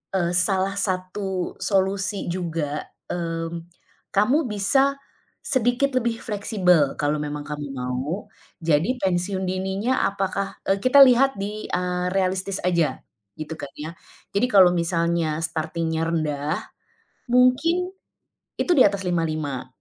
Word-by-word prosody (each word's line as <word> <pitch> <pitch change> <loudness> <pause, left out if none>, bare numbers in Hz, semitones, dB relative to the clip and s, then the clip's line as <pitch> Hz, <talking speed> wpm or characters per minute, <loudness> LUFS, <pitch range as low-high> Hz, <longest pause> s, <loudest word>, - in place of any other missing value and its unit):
eee, 175 -2 +1
salah 190 +1 +2
satu 185 -1 -2
solusi 195 +1 0
juga, 165 -5 -2 0.3
mmm, 165 -1 -4 0.5
kamu 250 +10 +3
bisa, 270 +8 +2 0.5
sedikit 260 +1 +1
lebih 235 -2 0
fleksibel 185 - +1
kalau 150 +1 +1
memang 150 0 -4
kamu 145 0 -5
mau 130 +10 -3 0.3
jadi 165 - +1
pensiun 190 +1 0
dininya 190 +7 -1
apakah 195 0 -3
eee, 195 - +4
kita 255 +2 +6
lihat 270 0 +5
di, 210 +2 -4
eee, 180 0 -1
realistis 190 0 0
aja 170 -4 +1 0.4
gitu 155 +1 -5
kan 140 - -6
ya, 155 +3 -6 0.4
jadi 240 +5 +2
kalau 190 -5 +7
misalnya 170 -2 0
starting-nya 160 0 -2
rendah, 155 -1 -1 0.7
mungkin, 325 +9 +3 0.6
itu - - -2
di 260 - +7
atas 200 -1 -1
55, 155 -6 -2
185 Hz, 120 wpm, -23 LUFS, 165-205 Hz, 0.7 s, kalau